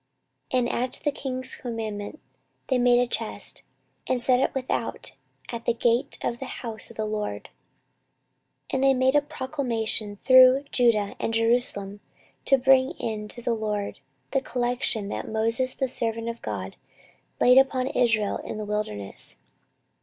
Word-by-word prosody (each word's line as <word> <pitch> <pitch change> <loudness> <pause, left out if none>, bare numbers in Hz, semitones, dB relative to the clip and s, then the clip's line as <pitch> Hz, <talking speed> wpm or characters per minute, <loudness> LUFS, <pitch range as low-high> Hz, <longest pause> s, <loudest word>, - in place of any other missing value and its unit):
14:024:008 255 - +3
And 240 - 0
at 250 +1 -1
the 290 - +2
king's 255 -2 -2
commandment 220 +1 -5 0.5
they 260 -2 +2
made 245 0 +5
a 245 - +3
chest, 245 - -2 0.5
and 255 - +1
set 250 +1 +3
it - - +1
without 260 -1 -3 0.4
at 235 -1 -6
the 235 - +1
gate 240 +4 +1
of 235 - -2
the 270 - -5
house 225 -4 -4
of 230 - -13
the 215 - -1
LORD. 210 -1 -4 1.2
14:024:009 - - -15
And 265 0 +1
they 270 0 +5
made 260 +1 +3
a 290 - +6
proclamation 250 -8 -3
through 255 +1 +7
Judah 225 -5 +2
and 225 - -1
Jerusalem, 225 -4 +2 0.5
to 270 - +5
bring 265 +2 +4
in 215 -8 -4
to 240 +3 -6
the 235 - +1
LORD 210 -2 -3 0.3
the 270 - +1
collection 245 -5 -1
that - - -5
Moses 230 +4 +1
the 265 - -1
servant 230 -2 -1
of 230 0 -7
God 95 -3 -5 0.6
laid 250 +1 +7
upon 265 -1 +2
Israel 225 -4 +1
in - - -7
the 215 - -4
wilderness. 205 - -3
240 Hz, 160 wpm, -25 LUFS, 215-260 Hz, 1.2 s, through